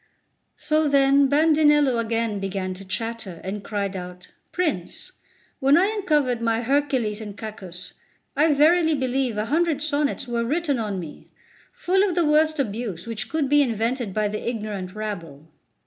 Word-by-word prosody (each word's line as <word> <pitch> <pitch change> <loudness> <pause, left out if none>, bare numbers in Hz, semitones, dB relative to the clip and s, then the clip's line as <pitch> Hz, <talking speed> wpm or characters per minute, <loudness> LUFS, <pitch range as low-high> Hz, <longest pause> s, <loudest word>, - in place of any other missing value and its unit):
So 310 -1 +1
then 275 0 +4
Bandinello 295 -4 +4
began 225 -3 -2
again 190 -1 -3
to 190 +2 -10
chatter, 200 -2 -5
and 200 +2 -5
cried 200 -2 -3
out: 180 0 -8 0.2
"Prince, 305 - -3 0.5
when 275 +3 +5
I 390 +5 +3
uncovered 295 - +1
my 230 0 0
Hercules 255 -5 0
and 205 -2 -8
Cacus, 190 -5 -8 0.4
I 305 +3 +4
verily 320 +2 +4
believe 260 -3 -1
a 210 - -1
hundred 320 +3 +1
sonnets 290 -3 -1
were 235 -1 -1
written 290 +1 0
on 205 -4 -3
me, 160 -4 -9 0.4
full 380 +2 +1
of 395 -3 +1
the 345 -2 +2
worst 310 +1 +3
abuse 215 -7 -3
which 230 0 -5
could 315 -3 0
be 290 +1 +4
invented 235 -2 -1
by 210 +2 0
the 210 +3 -3
ignorant 210 -5 -5
rabble." 170 -9 -6
240 Hz, 155 wpm, -23 LUFS, 205-295 Hz, 0.5 s, when